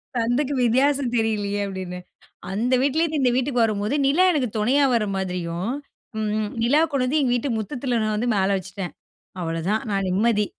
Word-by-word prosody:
சந்துக்கு 245 +5 0
வித்தியாசம் 260 +1 +2
தெரியலையே 205 -3 0
அப்டின்னு. 185 -2 -6 0.5
அந்த 235 +6 0
வீட்லேருந்து 310 +3 +1
இந்த 250 -2 +3
வீட்டுக்கு 255 -2 +1
வரும்போது 215 +3 0
நிலா 310 +7 +4
எனக்கு 265 -7 0
துணையா 255 +7 +3
வர 230 -2 +2
மாதிரியும் 180 +2 -3 0.5
ம், 215 -1 -1
ம். 210 -1 -2
நிலா 285 +7 +4
கொண்டந்து 270 +2 +1
எங்க 250 -3 +1
வீட்டு 255 +3 -1
முத்தத்தில 245 +2 -2
நான் 215 -1 0
வந்து 235 +3 -1
மேல 190 0 +2
வச்சுட்டேன். 195 0 -6 0.5
அவ்வளோதான் 165 +6 -1
நான் 195 -1 0
நிம்மதி 210 +2 +2
225 Hz, 160 wpm, -23 LUFS, 200-260 Hz, 0.5 s, நிலா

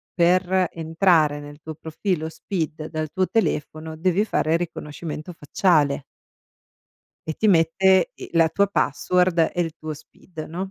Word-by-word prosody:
per 185 +1 +3
entrare 160 -2 +2
nel 145 +1 -11
tuo 160 0 -7
profilo 160 +1 -3
SPID 160 -4 -4
dal 155 -1 -3
tuo 185 -1 0
telefono 155 -6 -2
devi 185 +4 +2
fare 160 -6 +1
riconoscimento 160 0 -6
facciale". 145 -3 +1 1.3
E - - 0
ti 215 - +1
mette 185 +2 +4
i - - -9
la 165 -1 +5
tua 200 +4 +1
password 180 0 +2
e 175 - -2
il 165 -2 -1
tuo 155 0 -6
SPID, 155 +2 -11
no, 185 +4 -5
165 Hz, 140 wpm, -23 LUFS, 155-185 Hz, 1.3 s, la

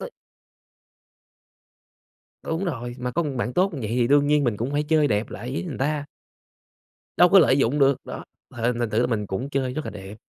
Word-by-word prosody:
T - - -6 2.3
Đúng 165 +4 -3
rồi, 120 -8 -4
mà 125 0 -3
có 170 - 0
bạn 130 -4 -3
tốt 185 +4 +1
như 140 - -5
vậy 110 - -3
thì 120 0 +1
đương 145 +2 +4
nhiên 150 0 +3
mình 120 -4 0
cũng 120 +6 -3
phải 145 - +1
chơi 150 -1 +2
đẹp 105 +1 -1
lại 120 +4 -6
với 140 - -2
người 165 -7 -6
ta. 145 +2 -1 1.1
Đâu 180 - +6
có 195 - +7
lợi 145 -6 +5
dụng 135 +2 +1
được, 140 -1 +2
đó, - - -7 0.3
th - - -18
thành 120 -1 0
thử 110 - +1
là 120 - +2
mình 110 -4 -2
cũng 110 +9 -4
chơi 130 -2 -1
rất 155 - -4
là - - -5
đẹp. 95 -1 -9
135 Hz, 215 wpm, -24 LUFS, 120-150 Hz, 2.3 s, có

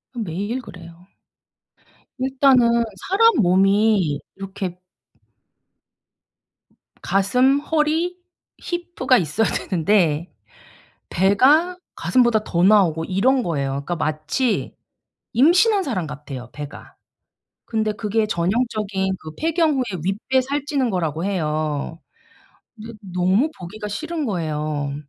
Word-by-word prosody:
매일 210 +4 -3
그래요. 175 -4 -13 1.1
일단은 255 -3 +3 0.2
사람 455 +4 +5
몸이 195 -3 +3 0.2
이렇게 190 -2 -6 2.2
가슴, 250 +8 +2
허리, 320 +4 0 0.4
히프가 345 -7 0
있어야 195 +5 0
되는데 170 -3 0 0.8
배가 275 - +3 0.2
가슴보다 235 -4 +2
더 170 0 0
나오고 180 -6 +4
이런 250 +7 +2
거예요. 140 -5 -2
그러니까 140 +5 -3
마치 155 - -1 0.6
임신한 370 - +4
사람 185 - -3
같아요 140 -4 -8
배가. 145 -1 -9 0.7
근데 220 -2 -1
그게 215 +1 -1
전형적인 195 0 -1
그 155 - -9
폐경 320 -2 +1
후에 205 -9 -2
윗배 210 +8 0
살찌는 275 -1 -1
거라고 165 -4 -2
해요. 155 -3 -2 0.8
네 225 +2 -9 0.2
너무 190 - +2
보기가 210 +4 -7
싫은 315 +7 -4
거예요. 155 - -2
205 Hz, 220 characters per minute, -21 LUFS, 170-260 Hz, 2.2 s, 사람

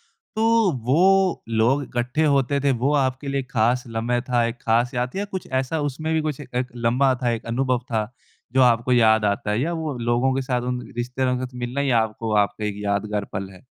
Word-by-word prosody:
तो 225 -3 +1
वो 185 +6 +3
लोग 115 +5 +2
इकट्ठे 130 +6 -1
होते 140 -1 +2
थे, 140 - +4
वो 130 +4 0
आपके 130 0 0
लिए 135 0 -1
खास 120 +1 +1
लम्ह 115 +2 -1
था, 120 -1 +2
एक 115 +1 -5
खास 120 +3 +1
याद 125 +4 -2
थी - - -3
या 205 - -1
कुछ 190 - -4
ऐसा 130 +4 0
उसमें 145 +3 -2
भी 160 - +2
कुछ 145 - -5
एक 125 0 -3
लम्हा 125 +3 +2
था 120 - +2
एक 115 0 -4
अनुभव 125 +1 0
था, 110 0 -1 0.4
जो 130 - +3
आपको 120 +1 +3
याद 110 -3 +4
आता 105 0 0
है 105 +3 0
या 165 +5 -1
वो 160 -5 -3
लोगों 120 +3 +1
के 135 - -1
साथ 125 -1 -1
उन 125 - -3 0.2
रिश्तेदारों 125 +1 -1
के 130 - -3
साथ 125 - -17
मिलना 125 +4 -3
या 130 -5 +2
आपको 110 0 -2
आपका 105 +1 -7
एक 105 -1 -2
यादगार 100 0 -1
पल 95 -1 -4
है? 95 +5 -16
125 Hz, 220 wpm, -23 LUFS, 115-140 Hz, 0.4 s, थे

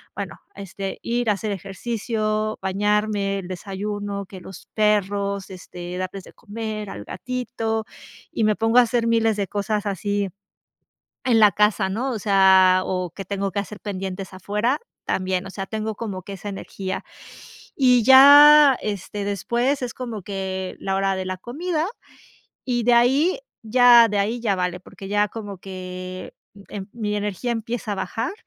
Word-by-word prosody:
bueno, - - -5 0.2
este, 195 0 -6
ir 240 0 0
a - - +4
hacer 210 +1 -4
ejercicio, 215 +2 -3
bañarme, 205 +1 0
el 185 - -8
desayuno, 200 +2 -5
que 190 -1 -11
los 185 0 -12
perros, 200 -2 0
este, 180 -1 -8
darles 185 +1 -5
de - - -15
comer 215 -1 -6
al - - -8
gatito, 235 -3 -3 0.5
y - - -1
me 215 0 +3
pongo 225 +2 +4
a - - +9
hacer 235 -1 +1
miles 225 -2 +2
de 200 -1 -1
cosas 210 +1 -2
así 200 +1 -1 1.0
en 240 -3 +3
la 210 -2 +7
casa 210 0 +2
¿no? 240 +7 -2
O 225 - -3
sea, 190 -2 +5
o 185 -1 -2
que 195 +4 -8
tengo 195 0 -3
que 200 - 0
hacer 205 +1 -8
pendientes 190 -1 -5
afuera 210 +8 -1 0.2
también. 185 0 -1
O - - -7
sea, 195 0 -5
tengo 220 +1 -3
como 200 -5 -5
que 200 - -9
esa 195 +2 -7
energía, 195 -1 -5 0.7
y 250 -3 +4
ya, 285 +2 +9
este, 205 0 -4
después 235 +7 -1
es 245 - -4
como 235 -5 -6
que 190 -1 -4
la 195 0 -1
hora 195 0 +1
de 190 0 -4
la 185 0 -3
comida, 310 - -2 0.8
y 240 -1 +1
de 240 +1 +4
ahí 270 - +3 0.2
ya 240 +1 +7
de 205 0 0
ahí 220 +5 0
ya 210 -4 +1
vale, 180 0 -2
porque 195 +1 -11
ya 205 0 +2
como 205 -3 -7
que, 185 -1 -7 0.4
em 195 -2 -6
mi 210 -3 -2
energía 210 +3 -2
empieza 230 -1 -3
a - - -4
bajar, 195 - -3
205 Hz, 165 wpm, -23 LUFS, 195-230 Hz, 1.0 s, a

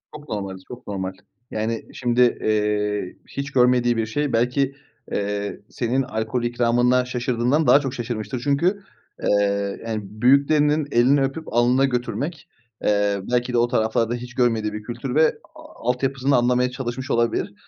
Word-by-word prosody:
Çok 150 0 -11
normaliz 95 -3 -5
çok 125 0 -11
normal. 95 -2 -3 0.4
Yani, 110 +1 -2
şimdi, 120 0 +1 0.2
eee, 105 -2 0
hiç 140 0 -5
görmediği 125 -2 +3
bir 115 - +1
şey 145 +5 -2
belki, 125 +4 +1 0.4
eee, 100 0 -2
senin 125 +2 0
alkol 115 0 -2
ikramına 120 +1 +2
şaşırdığından 125 +4 0
daha 130 +3 +7
çok 135 -3 -4
şaşırmıştır. 120 0 -4
Çünkü, 170 +8 +1 0.4
eee, 100 -1 +1
yani 110 -2 -2
büyüklerinin 140 +8 +3
elini 130 +4 +4
öpüp 135 +4 -3
alnına 125 +3 +4
götürmek, 145 +6 -3 0.3
eee, 100 -1 +2
belki 125 0 0
de - - +2
o 120 0 +3
taraflarda 115 0 +1
hiç 125 +1 -8
görmediği 115 -4 +1
bir 105 0 -6
kültür 120 +3 -5
ve, 160 +1 +6 0.3
a 120 - -7
altyapısını 135 +2 +1
anlamaya 125 +1 +2
çalışmış 130 +1 -4
olabilir. 115 -1 0
120 Hz, 145 wpm, -23 LUFS, 110-135 Hz, 0.4 s, daha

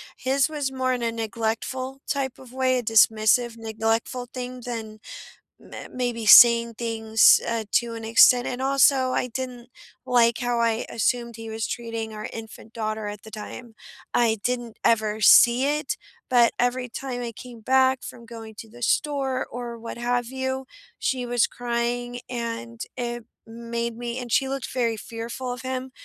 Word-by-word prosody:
his 265 +2 +1
was 290 -3 -3
more 260 -1 0
in 250 - -3
a 230 -1 0
neglectful 230 +4 -3
type 275 -2 -1
of 255 -2 -14
way, 260 -1 +1
a 245 - -2
dismissive, 225 +2 +3
neglectful 225 +2 -2
thing 250 0 -6
than 220 -3 -6 0.6
m - - -18 0.2
maybe 245 -3 -2
saying 235 +1 +8
things, 225 -1 +4
uh, 230 -1 -1
to 235 -1 +1
an 225 -1 -7
extent 245 +2 +6
And, 250 +1 -4
also, 270 -1 +4
I 250 - 0
didn't 245 0 -6 0.4
like 235 -2 +3
how 245 -1 -1
I 230 0 +1
assumed 235 0 -1
he 225 -1 -8
was 220 0 -3
treating 230 -2 -5
our 215 - -6
infant 225 0 -10
daughter 215 -1 -3
at 205 -1 -8
the 220 - -12
time. 220 +2 -9 0.4
I 225 -2 +2
didn't 240 -1 -3
ever 215 -1 +1
see 240 +4 +7
it, 420 +7 -3 0.3
but 240 -2 +5
every 250 +1 0
time 245 +1 -5
I 235 - -4
came 240 0 -11
back 260 +2 +3
from 235 -1 -9
going 225 -1 -10
to 225 - -9
the 240 +2 -14
store 270 0 0
or 240 -1 -7
what 230 +1 -8
have 245 0 0
you, 260 0 -3 0.3
she 255 -2 -1
was 240 -1 +2
crying, 245 0 -3
and 230 - -5 0.2
it 240 -1 -4 0.2
made 235 0 -4
me 240 0 -4
and 245 -2 -6
she 265 +3 +2
looked 270 -1 -4
very 230 -3 0
fearful 230 +3 -6
of 250 +1 -7
him, 260 0 -4
240 Hz, 170 wpm, -24 LUFS, 225-255 Hz, 0.6 s, saying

